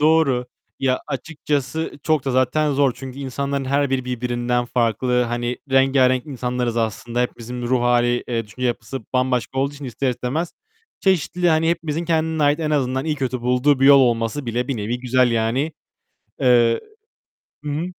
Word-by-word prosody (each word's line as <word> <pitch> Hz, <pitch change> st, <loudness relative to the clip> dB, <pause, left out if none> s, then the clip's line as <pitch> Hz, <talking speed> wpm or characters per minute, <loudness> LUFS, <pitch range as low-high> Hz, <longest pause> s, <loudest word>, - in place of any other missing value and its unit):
Doğru. 150 Hz, -5 st, +3 dB, 0.3 s
Ya 130 Hz, -1 st, +1 dB
açıkçası 145 Hz, +1 st, -3 dB
çok 155 Hz, -4 st, +1 dB
da 135 Hz, -, 0 dB
zaten 130 Hz, +4 st, +2 dB
zor. 140 Hz, -2 st, +3 dB
Çünkü 135 Hz, 0 st, -9 dB
insanların 140 Hz, +1 st, -3 dB
her 140 Hz, +1 st, +1 dB
biri 130 Hz, -1 st, 0 dB
birbirinden 120 Hz, 0 st, -1 dB
farklı. 125 Hz, +1 st, +1 dB
Hani 120 Hz, +1 st, -2 dB
rengârenk 135 Hz, -1 st, +3 dB
insanlarız 125 Hz, -3 st, -2 dB
aslında. 115 Hz, +2 st, -2 dB
Hepimizin 125 Hz, 0 st, -4 dB
bir -, -, -2 dB
ruh 125 Hz, 0 st, +2 dB
hâli, 120 Hz, 0 st, +2 dB
eee, 115 Hz, -2 st, -1 dB
düşünce 125 Hz, +4 st, -3 dB
yapısı 120 Hz, +2 st, -3 dB
bambaşka 125 Hz, -1 st, 0 dB
olduğu 140 Hz, +1 st, +1 dB
için 140 Hz, 0 st, -9 dB
ister 130 Hz, +2 st, -1 dB
istemez, 125 Hz, +8 st, -3 dB, 0.5 s
çeşitli, 180 Hz, -1 st, +1 dB
hani, 160 Hz, 0 st, +3 dB
hepimizin 165 Hz, -1 st, -2 dB
kendine 160 Hz, -1 st, 0 dB
ait, 145 Hz, +2 st, +3 dB
en 155 Hz, -1 st, -1 dB
azından 130 Hz, -1 st, 0 dB
iyi 155 Hz, -, 0 dB
kötü 130 Hz, -3 st, -2 dB
bulduğu 125 Hz, +3 st, +2 dB
bir 135 Hz, -, +5 dB
yol 140 Hz, -1 st, +8 dB
olması 120 Hz, +2 st, 0 dB
bile 120 Hz, +3 st, -2 dB
bir 135 Hz, -, -1 dB
nevi 110 Hz, +4 st, -2 dB
güzel 125 Hz, 0 st, +2 dB
yani. 115 Hz, +7 st, 0 dB, 0.7 s
Eee 120 Hz, -3 st, +4 dB, 0.8 s
Hı 150 Hz, -, -3 dB
hı. 155 Hz, +4 st, -2 dB
130 Hz, 165 wpm, -21 LUFS, 120-145 Hz, 0.8 s, yol